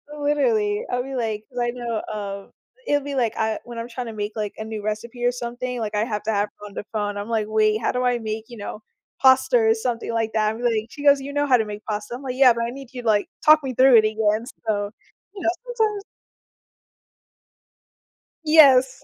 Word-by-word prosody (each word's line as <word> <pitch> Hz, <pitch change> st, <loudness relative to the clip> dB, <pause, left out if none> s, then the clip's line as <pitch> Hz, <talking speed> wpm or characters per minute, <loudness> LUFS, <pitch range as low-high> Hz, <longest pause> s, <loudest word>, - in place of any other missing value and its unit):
Literally. 240 Hz, -9 st, +1 dB
I'll 245 Hz, 0 st, 0 dB
be 270 Hz, 0 st, -6 dB
like 220 Hz, -3 st, -2 dB
'cause 245 Hz, -1 st, -6 dB
I 240 Hz, -, +1 dB
know, 235 Hz, -3 st, -3 dB
um, 200 Hz, -1 st, -6 dB, 0.4 s
it'll 290 Hz, -1 st, +2 dB
be, 285 Hz, -1 st, -5 dB
like, 235 Hz, -4 st, +1 dB
I 220 Hz, -1 st, 0 dB
when 240 Hz, -1 st, -9 dB
I'm 230 Hz, +1 st, -5 dB
trying 245 Hz, 0 st, -5 dB
to 225 Hz, -, -6 dB
make, 210 Hz, 0 st, -3 dB
like, 210 Hz, -2 st, -3 dB
a 220 Hz, -, -5 dB
new 220 Hz, -1 st, -6 dB
recipe 225 Hz, +3 st, -5 dB
or 245 Hz, -, +4 dB
something, 245 Hz, 0 st, -5 dB
like, 215 Hz, -1 st, -3 dB
I 210 Hz, +2 st, +1 dB
have 210 Hz, -3 st, -3 dB
to 220 Hz, -, -1 dB
have 205 Hz, 0 st, +1 dB
her 210 Hz, -, -10 dB
on 200 Hz, -, -13 dB
the 205 Hz, -, -6 dB
phone, 205 Hz, -1 st, -2 dB
I'm 205 Hz, +3 st, -5 dB
like, 220 Hz, -2 st, 0 dB
"Wait, 215 Hz, 0 st, +2 dB
how -, -, +1 dB
do 250 Hz, 0 st, -1 dB
I 245 Hz, -1 st, +2 dB
make, 220 Hz, 0 st, -4 dB
you 240 Hz, -2 st, -11 dB
know, 210 Hz, +1 st, -7 dB, 0.4 s
pasta 260 Hz, -1 st, +5 dB
or 225 Hz, -1 st, +4 dB
something 230 Hz, 0 st, -3 dB
like 225 Hz, -1 st, 0 dB
that?" 215 Hz, 0 st, +1 dB
I'm 235 Hz, -, -8 dB
like 225 Hz, -2 st, 0 dB
she 290 Hz, 0 st, -10 dB
goes, 285 Hz, -1 st, +6 dB
"You 280 Hz, +1 st, -7 dB
know 290 Hz, 0 st, +1 dB
how 255 Hz, -3 st, +5 dB
to 220 Hz, -, 0 dB
make 210 Hz, 0 st, -7 dB
pasta." 210 Hz, +2 st, -4 dB
I'm, 260 Hz, -, -9 dB
like, 255 Hz, -1 st, -4 dB
"Yeah, 260 Hz, -3 st, +7 dB
but 235 Hz, 0 st, -2 dB
I 235 Hz, -, -2 dB
need 270 Hz, 0 st, -10 dB
you, 250 Hz, -, -6 dB
like 210 Hz, -3 st, +2 dB, 0.2 s
talk 310 Hz, -1 st, +7 dB
me 260 Hz, -1 st, -3 dB
through 260 Hz, 0 st, +6 dB
it 215 Hz, -, +5 dB
again." 215 Hz, +1 st, +1 dB, 0.2 s
So, 205 Hz, -1 st, -1 dB, 0.4 s
you 385 Hz, -, -7 dB
know, 335 Hz, -, +3 dB, 0.2 s
sometimes 440 Hz, -4 st, -1 dB, 2.4 s
Yes. 270 Hz, -4 st, +6 dB
230 Hz, 235 wpm, -23 LUFS, 215-255 Hz, 2.4 s, Yeah